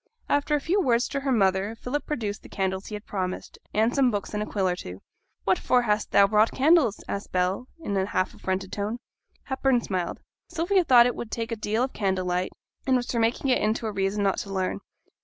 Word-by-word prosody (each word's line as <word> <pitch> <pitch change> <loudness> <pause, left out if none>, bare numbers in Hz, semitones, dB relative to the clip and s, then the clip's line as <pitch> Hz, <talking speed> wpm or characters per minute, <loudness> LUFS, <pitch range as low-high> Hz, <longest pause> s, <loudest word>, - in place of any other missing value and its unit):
After 290 +1 +2
a - - +1
few 360 +8 +1
words 245 -6 +2
to 280 - -2
her 275 -1 -1
mother, 195 -1 +2
Philip 255 +5 -4
produced 215 -8 -3
the - - -14
candles 190 0 -2
he 210 - -5
had 210 - -8
promised, 185 -2 -4
and 220 +3 +2
some 270 -3 +4
books 205 -3 -3
and 210 - -1
a 210 - -3
quill 195 -3 0
or 180 - +1
two. 90 - -9 0.4
'What 190 -1 +2
for 250 -1 +2
hast 210 -2 0
thou 200 - +6
brought 215 +2 +3
candles?' 280 - +3
asked 200 - -5
Bell, 185 +7 0
in 205 -11 -3
a 190 0 +1
half 185 -2 -1
affronted 190 0 -3
tone. 210 +3 -2 0.5
Hepburn 265 -2 +1
smiled. 185 -5 -3 0.3
'Sylvia 355 +2 +2
thought 245 -4 +7
it 245 - +1
would 235 - -6
take 230 +1 -4
a - - 0
deal 220 +2 -1
of 260 - -3
candlelight, 185 -2 -1 0.4
and 260 - +4
was 245 -1 -1
for 235 - 0
making 235 +4 +1
it 250 - +2
into 220 +2 0
a 220 - -1
reason 200 +1 -1
not 195 -1 +1
to 195 - -6
learn. 190 -1 -1
215 Hz, 225 wpm, -26 LUFS, 195-250 Hz, 0.5 s, thought